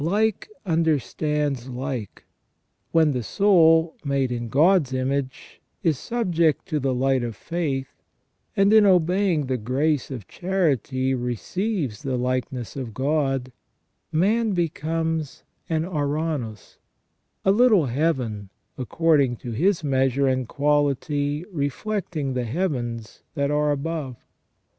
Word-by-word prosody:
Like 210 - 0 0.2
understands 150 -4 0
like. 125 -4 -5 0.7
When 160 -2 +4
the 125 -3 -1
soul, 165 - +4
made 140 -3 0
in 120 -1 -3
God's 155 - +3
image, 130 0 -3 0.2
is 160 -6 +1
subject 175 -10 0
to 155 -3 0
the 135 -1 0
light 135 0 +2
of 115 -4 -4
faith^ 150 -5 -2 0.7
and 195 +2 +4
in 215 -2 +7
obeying 180 -3 +3
the 130 0 -1
grace 135 +5 0
of 120 -9 -7
charity 140 - 0
receives 130 - -2
the 130 -2 -2
likeness 125 -1 -2
of 125 -6 -6
God, 135 -2 0 0.6
man 210 +7 +2
becomes 160 -2 -2 0.3
an 160 -1 +1
ouranos, 150 - -3 0.7
a 195 - +5
little 215 - +5
heaven, 125 - -1 0.3
according 140 -1 +2
to 120 +1 -7
his 170 - +1
measure 135 -1 +2
and 130 -2 0
quality 145 +1 0
reflecting 155 -1 -2
the 125 -1 -1
heavens 120 -6 -3
that 140 -1 0
are 150 0 +2
above. 145 -2 -2
145 Hz, 115 wpm, -24 LUFS, 130-165 Hz, 0.7 s, in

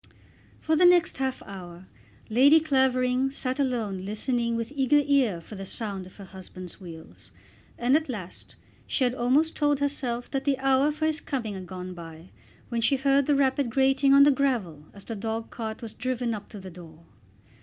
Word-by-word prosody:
For 315 - +1
the 335 - +3
next 355 -5 +4
half 265 -1 -2
hour 180 -2 -10 0.4
Lady 275 +8 +6
Clavering 260 -3 +2
sat 260 -1 -3
alone 225 -8 -1
listening 235 +3 -1
with 230 +2 -3
eager 285 +2 +3
ear 265 -11 +2
for 165 - -13
the 195 -1 -7
sound 195 -2 -5
of 185 - -17
her 200 - -10
husband's 185 0 -10
wheels, 160 - -12 0.5
and 245 +3 +2
at 310 -1 0
last 185 -8 -7 0.3
she 270 - 0
had 245 -1 +2
almost 265 +6 +1
told 290 -1 +2
herself 260 -4 -2
that 270 -1 -2
the 280 -2 +1
hour 270 +2 +2
for 305 +1 -2
his 310 -1 0
coming 235 -7 -3
had 185 -2 -8
gone 185 0 -7
by, 165 0 -11 0.4
when 235 -1 -1
she 275 +5 +3
heard 275 0 +2
the 295 - +3
rapid 275 -1 +1
grating 270 +2 +3
on 280 - +8
the 290 - +6
gravel 230 - -1
as 200 - -14
the 230 - -6
dog 225 +2 -4
cart 220 -1 -6
was 225 - -7
driven 250 -2 -2
up 205 -2 -7
to 210 - -9
the 185 -1 -10
door. 165 -2 -13
245 Hz, 190 wpm, -26 LUFS, 195-275 Hz, 0.5 s, on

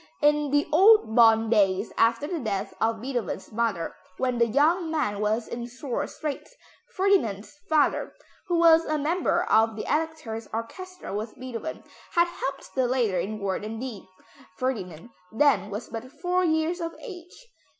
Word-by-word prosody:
In 295 -1 +3
the 290 +2 +2
old 385 - +6
Bonn 225 -1 +6
days, 195 -2 +2
after 230 +4 +2
the 335 +2 -3
death 205 -7 -3
of 225 0 +1
Beethoven's 245 -5 -4
mother, 215 -7 -1 0.2
when 255 -2 0
the 235 - +4
young 320 - +2
man 275 -11 -1
was 215 +2 0
in 235 0 -5
sore 245 +1 -4
straits, 305 - -6 0.4
Ferdinand's 325 - +1 0.2
father, 310 -2 +2 0.4
who 350 -2 +1
was 330 -1 +6
a 310 -1 -1
member 315 +5 +1
of 220 0 +3
the 215 - -4
Elector's 300 -8 -2
orchestra 365 - -6
with 215 +2 -5
Beethoven, 255 +4 -6 0.3
had 345 0 +5
helped 275 -5 -6
the 260 -2 +1
latter 235 -7 +1
in 205 +5 -3
word 200 -1 -2
and 220 +1 -5
deed. 245 -5 -7 0.5
Ferdinand 205 -6 -4 0.2
then 220 -6 +3
was 210 +3 -5
but 230 +3 -7
four 360 +3 0
years 325 +1 +1
of 330 0 -4
age. 365 +1 -11
255 Hz, 160 wpm, -26 LUFS, 220-320 Hz, 0.5 s, old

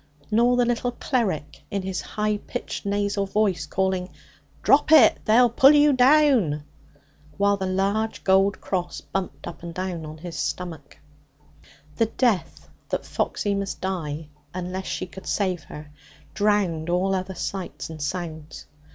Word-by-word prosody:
Nor 240 +3 +4
the 245 - +4
little 240 +1 -1
cleric, 205 - -2
in 200 -1 -2
his 185 -1 -3
high 210 0 -1
pitched 205 - -6
nasal 200 0 0
voice, 195 -6 0
calling: 190 +1 -1 0.5
'Drop 290 +2 +4
it! 290 -9 +7
They'll 235 +2 +5
pull 270 +4 +7
you 295 0 +5
down!' 255 - +4 0.7
while 200 0 +3
the 190 -1 -3
large 200 +4 -1
gold 195 +1 +3
cross 180 -2 -3
bumped 180 -7 -5
up 170 - -8
and 170 -1 -8
down 185 -3 -3
on 155 +1 -9
his 170 +1 -8
stomach. 165 -6 -5 1.0
The 225 - +3
death 210 -9 0 0.2
that - - -2
Foxy 205 -2 -1
must 200 -1 -3
die, 160 -5 -4 0.3
unless 185 +1 -4
she - - -3
could 190 +1 -12
save 185 -6 -1
her, 150 0 -10 0.4
drowned 195 -6 +1
all 185 +2 +1
other 190 0 -3
sights 180 -1 -5
and 155 -1 -8
sounds. 160 -1 -5
190 Hz, 145 wpm, -24 LUFS, 175-215 Hz, 1.0 s, it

